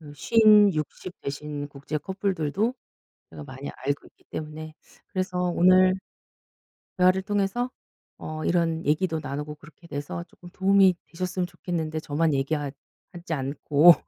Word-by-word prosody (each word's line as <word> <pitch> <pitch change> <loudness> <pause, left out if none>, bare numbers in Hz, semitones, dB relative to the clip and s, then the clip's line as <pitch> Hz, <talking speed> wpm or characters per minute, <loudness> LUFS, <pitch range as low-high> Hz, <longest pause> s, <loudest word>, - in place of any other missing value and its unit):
50, 210 -2 +6
60 155 +4 -5
되신 145 +1 -4
국제 145 +2 -5
커플들도 190 - -1 0.6
제가 150 - -9
많이 135 0 -7
알고 140 +2 -3
있기 - - -32
때문에 155 0 -6 0.3
그래서 185 -2 -2
오늘 185 +2 +5 1.0
대화를 185 +1 +4
통해서 205 +5 0 0.5
어 155 0 -6
이런 165 -2 +1
얘기도 160 +2 +1
나누고 150 +2 -5
그렇게 165 +3 -17
돼서 145 +4 -5
쪼끔 175 - -15
도움이 190 0 +4
되셨으면 180 +1 -2
좋겠는데 160 -3 -3
저만 155 0 0
얘기 135 +3 0
하 145 -2 -3 0.4
하지 170 -1 -5
않고. 145 +4 +5
165 Hz, 280 characters per minute, -26 LUFS, 150-185 Hz, 1.0 s, 50